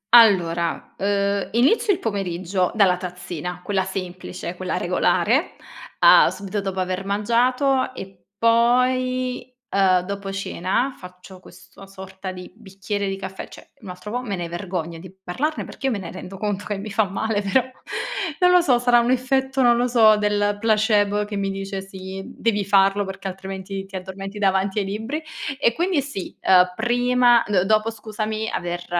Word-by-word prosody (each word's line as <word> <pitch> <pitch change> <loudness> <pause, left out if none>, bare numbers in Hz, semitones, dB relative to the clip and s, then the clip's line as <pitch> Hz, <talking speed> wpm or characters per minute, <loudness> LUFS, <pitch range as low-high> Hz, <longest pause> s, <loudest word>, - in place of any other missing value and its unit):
Allora, 175 -7 +4
uhm, 200 0 0
inizio 270 - +3
il 380 - +1
pomeriggio 185 -3 -2
dalla 195 -4 +4
tazzina, 180 -1 -6
quella 190 0 0
semplice, 185 - -6
quella - - -3
regolare, - - +1 0.5
uhm, - - +8
subito 195 +3 -3
dopo 190 -1 -4
aver 185 +1 -2
mangiato 250 +7 +1
e 190 -5 -10
poi, 250 +2 +2 0.2
uhm, 190 -2 +3
dopo 200 +1 -5
cena, 195 +6 -1
faccio 180 +1 -13
questo 195 +1 -15
sorta 190 0 -8
di 180 -1 -10
bicchiere 200 -1 -4
di 195 - -2
caffè 190 0 -7
cioè - - -15
un 195 - -9
altro 180 +3 -8
po' 245 +2 -2
me 215 -6 -4
ne 175 -1 -4
vergogno 175 -2 -4
di 180 +1 -11
parlarne 295 - -2
perché, 270 - -5
io - - +1
me 220 - -1
ne 190 -3 -7
rendo 185 +1 -9
conto 205 0 -3
che 205 - -3
mi 200 +2 -6
fa 220 +2 +2
male 205 +2 -1
però, 205 +6 +2 0.8
non 360 0 +5
lo 360 0 +6
so, 260 -8 +3
sarà 240 0 +4
un 235 +1 +1
effetto, 265 +1 +1
non 240 -1 +5
lo 245 +1 +1
so, 225 -3 +6
del 205 0 +1
placebo, 210 -2 +2
che 205 0 -6
mi 195 -1 -1
dice: 195 0 -5
"Sì, 190 0 -8
devi 225 -3 -1
farlo 195 +1 +3
perché 195 0 -6
altrimenti 195 +1 -6
ti 195 0 -12
addormenti 195 +2 -7
davanti 195 0 +1
ai 200 - -1
libri". 220 +10 -4 0.4
E 235 -5 +3
quindi 345 -1 +1
sì, 265 -9 -7
ehm, 180 -1 +5
prima 245 +1 +3
d 195 -4 +2
dopo 215 +2 +2
scusami 220 0 -4
aver 175 0 -4
200 Hz, 170 wpm, -22 LUFS, 190-230 Hz, 0.8 s, uhm